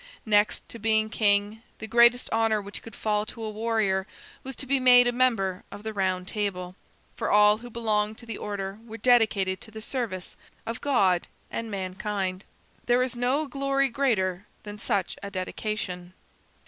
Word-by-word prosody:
Next 210 -1 +2
to 230 - -8
being 220 0 +2
king, 205 0 +2 0.2
the - - -6
greatest 235 +2 +5
honor 225 -1 +2
which 200 0 -7
could 225 - -11
fall 210 -1 0
to 225 - -7
a 215 - -3
warrior 215 -3 0 0.3
was 265 0 -7
to - - -5
be 270 +1 +2
made 250 -1 +7
a 245 - +3
member 230 -6 +1
of 205 - -9
the 220 0 -4
Round 185 -2 -1
Table, 185 -4 -3 0.4
for - - -2
all 210 +1 +5
who 245 +1 -10
belonged 220 -2 0
to 235 - -13
the 230 -3 -6
order 200 0 -4
were 225 -1 -9
dedicated 220 -6 +3
to - - -7
the 220 0 -9
service 215 -6 -4 0.3
of 230 0 -5
God 195 -11 +2 0.2
and 230 -1 -4
mankind. 190 0 -3 0.4
There 245 +1 +4
is 255 -1 -3
no 255 +5 +1
glory 275 0 0
greater 205 -8 0 0.2
than 205 0 -8
such 200 -5 -1
a 200 - -5
dedication. 185 -2 -4
215 Hz, 175 wpm, -27 LUFS, 195-235 Hz, 0.4 s, made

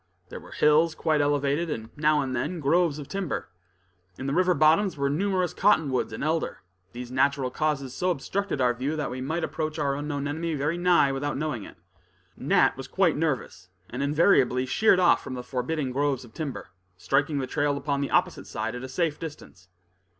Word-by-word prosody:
There - - -7
were - - -15
hills 155 +2 +3
quite 155 -2 +1
elevated, 145 +3 +1
and, 115 -5 -6
now 150 0 +2
and 130 -1 -3
then, 160 +8 -2
groves 160 +1 +2
of 145 -3 -8
timber. 195 - -4 0.7
In 130 - -6
the 135 - -1
river 180 +1 +3
bottoms 160 +5 +3
were 140 0 0
numerous 185 +2 0
cottonwoods 155 -10 +2
and - - -5
elder; 160 - -1 0.3
these 125 0 -8
natural 135 0 +1
causes 140 -3 -1
so 180 - -1
obstructed 185 +2 -2
our 125 -1 +3
view, 135 +6 -2
that 150 - -3
we 130 +1 -5
might 160 +6 -2
approach 155 -1 -3
our 140 -3 0
unknown 145 0 -3
enemy 160 +2 -2
very 150 +5 -1
nigh 175 -6 +4
without 140 +1 -2
knowing 145 -8 -3
it. - - -13 0.6
Nat - - +2
was - - -7
quite - - +2
nervous, 95 0 -3 0.2
and 125 - -4
invariably 140 -4 +3
sheered 190 +7 +3
off 180 -2 +4
from 130 - -6
the 125 - -6
forbidding 130 +3 -2
groves 135 -1 -1
of 110 - -17
timber, 145 -10 -5 0.3
striking 145 - 0
the 135 - -1
trail 145 +2 0
upon 140 0 -2
the 140 - -2
opposite 180 0 0
side 115 +1 -3
at 125 - -6
a 130 - -7
safe 155 +2 -1
distance. 145 - -10
145 Hz, 195 wpm, -26 LUFS, 130-160 Hz, 0.7 s, nigh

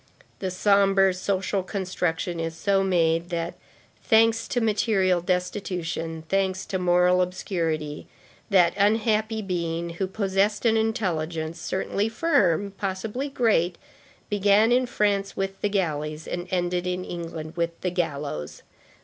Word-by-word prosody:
The 190 - -2
sombre 195 0 +4
social 190 +1 -1
construction 180 -3 -2
is 165 0 -3
so 195 +2 +2
made 170 -2 +1
that, 170 -1 -2 0.5
thanks 225 0 +4
to 245 - 0
material 205 -5 +2
destitution, 180 -3 -2
thanks 190 0 0
to 190 - -2
moral 180 0 +4
obscurity, 165 -5 -2 0.4
that 180 -4 +5
unhappy 215 +1 +2
being 170 -2 -2
who 190 - +1
possessed 200 +2 0
an 225 -1 +4
intelligence, 170 -7 -1
certainly 200 +4 -1
firm, 205 - +2
possibly 210 +8 -3
great, 210 -10 +1 0.5
began 205 +2 +3
in 250 +1 +3
France 200 -3 0
with 195 0 -3
the 205 - +1
galleys, 155 -5 -2
and 175 +1 -4
ended 180 0 -1
in 180 0 -2
England 165 -2 -6
with 170 -1 -2
the 180 - -1
gallows. 145 - -3
185 Hz, 125 wpm, -25 LUFS, 170-205 Hz, 0.5 s, that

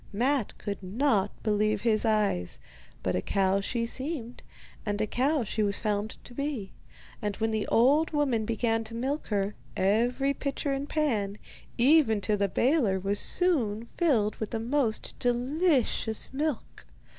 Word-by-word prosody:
Matte 245 +3 0
could 200 -1 -5
not 205 +1 +1
believe 215 -1 +1
his 225 -1 +2
eyes. 210 - +1 0.5
But - - 0
a 90 - 0
cow 195 - +1
she 230 +3 -1
seemed, 260 -1 -5 0.4
and 205 -1 -2
a 215 - +2
cow 270 +5 +1
she 215 +1 -2
was 200 -1 +1
found 210 0 -2
to - - -13
be; 275 -7 -3 0.5
and 205 -2 -2
when 225 0 -1
the 215 -1 -1
old 285 +7 +4
woman 280 -7 +1
began 225 +1 0
to 230 +1 -6
milk 270 +6 -2
her, 200 -1 0 0.2
every 240 +8 +2
pitcher 280 +1 -2
and 275 +2 -3
pan, 215 -10 0 0.4
even 250 -4 +5
to 210 +2 +1
the 200 -1 +1
baler, 235 - +2
was 200 +2 0
soon 235 - +1
filled 235 - +1
with 220 - -4
the 225 - -3
most 235 -1 -1
delicious 250 -2 +1
milk. 265 - -3
225 Hz, 155 wpm, -28 LUFS, 205-275 Hz, 0.5 s, even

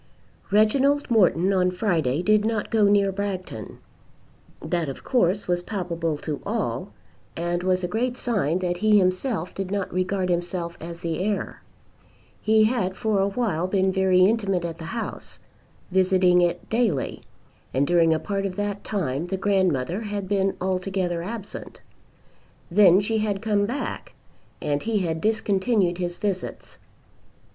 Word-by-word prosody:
Reginald 265 +7 +3
Morton 190 -3 +4
on 180 -1 +3
Friday 175 - 0
did 215 +1 +4
not 220 -1 -1
go 220 -3 +4
near 200 -1 +4
Bragton. 190 - -5 0.8
That 165 -1 -2
of 135 - -8
course 200 -5 +1
was 175 -1 +1
palpable 170 -5 -3
to 150 0 -5
all, - - -2 0.5
and 175 +1 -1
was 185 0 +1
a - - 0
great 245 +6 -1
sign 195 - 0
that 180 -1 -1
he 215 +2 +4
himself 185 0 0
did 195 -1 -4
not 200 -2 -2
regard 185 +1 0
himself 175 0 -2
as 170 0 -7
the 165 -1 -2
heir. 205 -1 -2 0.8
He 220 0 +4
had 215 -5 0
for 215 -3 +1
awhile 195 -4 0
been 190 0 +2
very 190 -1 +3
intimate 195 -4 +1
at 165 -1 -5
the 160 - -7
house, 230 +8 -5 0.5
visiting 185 -1 +4
it 175 0 0
daily 220 - 0 0.5
and 135 +2 +1
during 165 0 +4
a 160 - +3
part 195 +4 -2
of 185 - -7
that 205 0 -3
time 165 -6 -2
the 190 - -2
grandmother 185 - +1
had 205 -3 -4
been 195 -1 0
altogether 185 -2 -1
absent. 205 +2 -7 0.9
Then 190 0 +6
she 220 +2 0
had 210 -2 -1
come 205 -1 +1
back, 260 +6 -4 0.5
and 145 0 0
he 225 -1 0
had 165 -4 -1
discontinued 205 -3 +1
his 175 -1 -3
visits. 195 -3 -4
190 Hz, 150 wpm, -24 LUFS, 175-205 Hz, 0.9 s, Then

